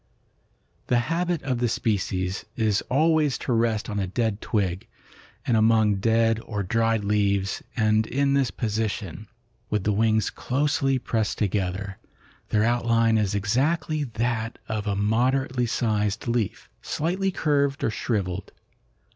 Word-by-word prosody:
"The 125 - +3 0.2
habit 175 -1 -1
of 130 -3 -1
the 120 -1 +1
species 95 -4 -1
is 110 -3 +1
always 155 +1 +3
to 125 - -2
rest 115 -1 +1
on 105 -2 -3
a 95 - -1
dead 110 +1 -1
twig 95 -4 -1 0.6
and 120 - +2
among 110 -2 +4
dead 115 +2 +2
or 105 -3 -3
dried 115 +1 +1
leaves, 100 -1 +1 0.2
and 110 -1 +2
in 140 +2 +1
this 135 -3 +2
position, 105 -3 -3 0.4
with 105 -2 0
the 105 - +1
wings 110 0 +2
closely 140 0 0
pressed 115 -4 -1
together, 95 -1 -2 0.5
their 105 0 +2
outline 115 -1 +2
is 100 -1 0
exactly 145 - 0
that 115 -1 -2
of 110 -1 -3
a 100 - 0
moderately 125 +4 +1
sized 105 -2 -1
leaf, 115 -2 -1
slightly 185 +5 -1
curved 140 -5 0
or 110 - +1
shrivelled. 100 -6 -2
115 Hz, 135 wpm, -25 LUFS, 105-125 Hz, 0.6 s, among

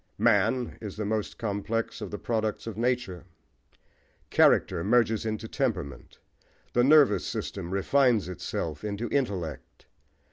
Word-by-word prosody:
Man 125 -2 +2
is 105 -3 -7
the 105 - -2
most 110 0 -2
complex 110 +2 -3
of 105 - -5
the 105 - -5
products 110 -2 -2
of 115 -3 -5
nature. 120 -7 -1 1.1
Character 85 - +4
merges 115 0 +2
into 110 +1 -3
temperament: 105 - -3 0.6
the 120 - +3
nervous 135 - +5
system 90 -4 -4
refines 115 +2 +2
itself 80 -3 -4
into 105 +2 -3
intellect. 100 - -3
110 Hz, 120 wpm, -27 LUFS, 100-120 Hz, 1.1 s, nervous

